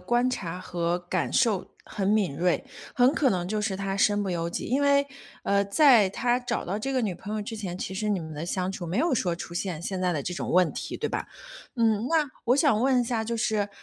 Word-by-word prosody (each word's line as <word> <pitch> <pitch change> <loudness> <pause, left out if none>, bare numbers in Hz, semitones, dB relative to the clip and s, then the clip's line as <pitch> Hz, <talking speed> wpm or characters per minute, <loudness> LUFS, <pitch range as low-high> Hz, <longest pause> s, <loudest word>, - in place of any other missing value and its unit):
观 240 +1 +1
察 180 -7 -4
和 175 -1 -1
感 175 0 -2
受 225 -7 +1
很 195 -2 -3
敏 200 -9 +2
锐， 180 - +1 0.3
很 250 +2 +5
可 270 -5 +3
能 180 -2 -1
就 215 +1 -1
是 205 -2 -1
他 195 0 -2
身 205 0 +3
不 195 - -2
由 170 -1 -1
己。 170 - -4
因 265 +4 +1
为， 280 0 +4 0.4
呃， 200 0 +2
在 225 -2 +5
他 240 +5 +1
找 245 - -3
到 195 +4 -2
这 270 +5 -3
个 260 - +1
女 195 -5 -1
朋 205 +5 -6
友 215 - -2
之 225 +2 -6
前， 185 -4 -5
其 190 - -5
实 210 +2 -2
你 195 -4 +1
们 160 -1 -7
的 155 +3 -5
相 185 0 -1
处 180 -2 -6
没 175 +6 -2
有 325 +3 +2
说 175 -6 0
出 170 - -8
现 175 -2 -3
现 190 0 -3
在 180 -1 +1
的 150 -4 -2
这 180 - -4
种 - - -4
问 180 -1 +4
题， - - -5
对 - - -2
吧？ - - -3 0.5
嗯， 225 0 +2
那 315 -4 +2
我 250 +3 +3
想 280 -7 +3
问 255 0 +3
一 - - 0
下， 230 -2 -1
就 230 +1 -2
是 215 -2 0
205 Hz, 270 characters per minute, -27 LUFS, 180-240 Hz, 0.5 s, 很